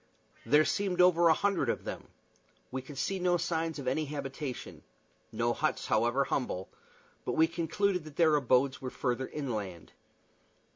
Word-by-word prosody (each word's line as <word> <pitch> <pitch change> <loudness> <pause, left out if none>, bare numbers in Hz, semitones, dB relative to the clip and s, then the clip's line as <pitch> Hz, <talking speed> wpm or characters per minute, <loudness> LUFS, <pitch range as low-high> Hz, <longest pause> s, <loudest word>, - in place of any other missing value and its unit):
There 150 +5 +5
seemed 190 -3 -1
over 175 -1 +6
a - - +7
hundred 200 +3 +1
of - - -1
them. - - -6 0.6
We 130 +1 -3
could 135 +2 -11
see 195 +7 -1
no 180 -1 +2
signs 165 -1 -1
of 140 -3 -6
any 155 +4 +1
habitations 140 -2 -6 0.5
no 120 +2 0
huts, 155 +4 -1
however 120 +5 +2
humble; 95 -9 -2 0.5
but - - -2
we 160 - +5
concluded 180 +3 0
that 155 -2 -11
their 160 -2 +4
abodes 130 -1 +2
were 130 - -3
farther 125 0 -2
inland. 105 - -5
145 Hz, 155 wpm, -31 LUFS, 130-170 Hz, 0.6 s, a